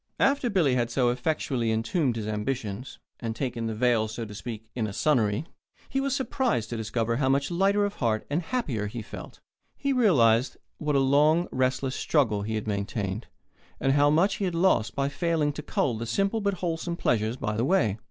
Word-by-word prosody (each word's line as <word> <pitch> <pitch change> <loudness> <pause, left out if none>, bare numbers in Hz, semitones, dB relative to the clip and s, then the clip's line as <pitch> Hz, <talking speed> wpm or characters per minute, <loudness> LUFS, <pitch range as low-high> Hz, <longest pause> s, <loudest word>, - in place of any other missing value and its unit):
After 275 -2 +2
Billy 175 - +3
had 120 -2 +1
so 120 0 +2
effectually 125 -3 -1
entombed 120 +4 0
his 110 -2 -4
ambitions, 110 +1 -3 0.2
and 115 -2 -4
taken 120 -2 -3
the 110 - -3
veil, 115 -1 +2
so 115 +1 -5
to 105 - -9
speak, 110 0 -7
in 115 -3 -1
a 100 - -6
sonnery, 120 -2 +1 0.4
he 270 - 0
was 275 -1 0
surprised 245 - -1
to - - -2
discover 115 +1 -1
how 130 -1 +1
much 140 +4 +1
lighter 200 +3 +3
of 205 - -4
heart 110 -3 0
and 150 +5 0
happier 150 - -2
he 110 +2 -6
felt. - - -10 0.4
He 280 0 0
realized 130 - +4 0.2
what 150 -1 0
a - - +5
long, 150 +5 +4
restless 130 +1 0
struggle 115 -10 +1
he 110 +2 -3
had 110 - -3
maintained, 100 0 -3 0.5
and 135 0 +2
how 145 +1 +4
much 175 +7 +3
he 200 - -1
had 180 -2 -2
lost 165 - +2
by 140 0 +1
failing 155 0 0
to 150 - -6
cull 135 -3 0
the 115 +1 -5
simple 195 - 0
but 200 -1 0
wholesome 170 -1 -2
pleasures 115 -3 0
by 105 -3 -2
the 115 - 0
way. 115 - +2
130 Hz, 200 wpm, -27 LUFS, 110-165 Hz, 0.5 s, a